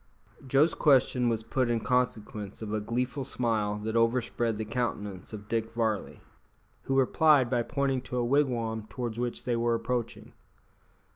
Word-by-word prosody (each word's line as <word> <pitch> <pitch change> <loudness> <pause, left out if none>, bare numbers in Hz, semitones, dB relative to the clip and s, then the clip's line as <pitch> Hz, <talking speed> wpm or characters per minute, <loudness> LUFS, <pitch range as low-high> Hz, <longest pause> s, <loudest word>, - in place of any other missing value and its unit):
Joe's 140 +5 +4
question 130 -4 +3
was 115 -1 -1
put 125 +2 0
in 120 -1 +1
consequence 110 -4 -2
of 105 -1 -4
a 110 - 0
gleeful 125 +5 -2
smile 110 -5 -1
that 110 +1 -2
overspread 115 -1 +1
the 110 - -3
countenance 105 -5 -3
of 105 -1 -8
Dick 115 0 -2
Varley, 110 -3 -1 0.6
who 135 - 0
replied 135 -1 +4
by 120 -2 +2
pointing 135 +1 -1
to 125 - -2
a 120 - +1
wigwam 120 -5 0
towards 120 -2 -4
which 120 -1 -3
they 120 -1 0
were 115 0 +1
approaching. 115 0 -3
120 Hz, 155 wpm, -29 LUFS, 110-125 Hz, 0.6 s, Joe's